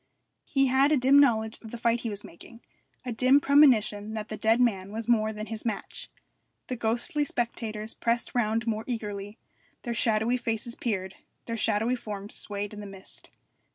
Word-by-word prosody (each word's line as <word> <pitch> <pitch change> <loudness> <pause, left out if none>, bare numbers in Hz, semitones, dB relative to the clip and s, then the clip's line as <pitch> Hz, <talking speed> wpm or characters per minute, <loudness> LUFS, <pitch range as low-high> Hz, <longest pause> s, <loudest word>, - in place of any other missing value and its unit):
He 275 -2 +2
had 265 +3 +3
a 305 - +4
dim 270 +2 +5
knowledge 220 -5 +2
of 225 - -10
the 235 - -7
fight 235 0 +1
he 230 - -4
was 205 -1 -5
making, 230 +7 -14 0.4
a 250 - -3
dim 255 +4 +4
premonition 225 -8 +4
that 215 -1 -5
the 215 - -4
dead 220 +2 +2
man 200 -6 +1
was 225 +1 -5
more 220 -2 +3
than 215 0 -6
his 220 -1 -5
match. 225 -3 -5 0.6
The 255 - -2
ghostly 240 +5 0
spectators 225 -4 -3
pressed 235 0 -1
round 225 -2 0
more 220 -1 -1
eagerly, 210 -3 -5 0.5
their 240 - -3
shadowy 225 +2 +1
faces 230 -1 -2
peered, 190 -6 -3 0.3
their 230 - -3
shadowy 225 +2 +1
forms 205 -4 -3
swayed 205 0 -2
in 210 - -8
the 205 - -7
mist. 195 -1 -2
225 Hz, 180 wpm, -27 LUFS, 210-240 Hz, 0.6 s, dim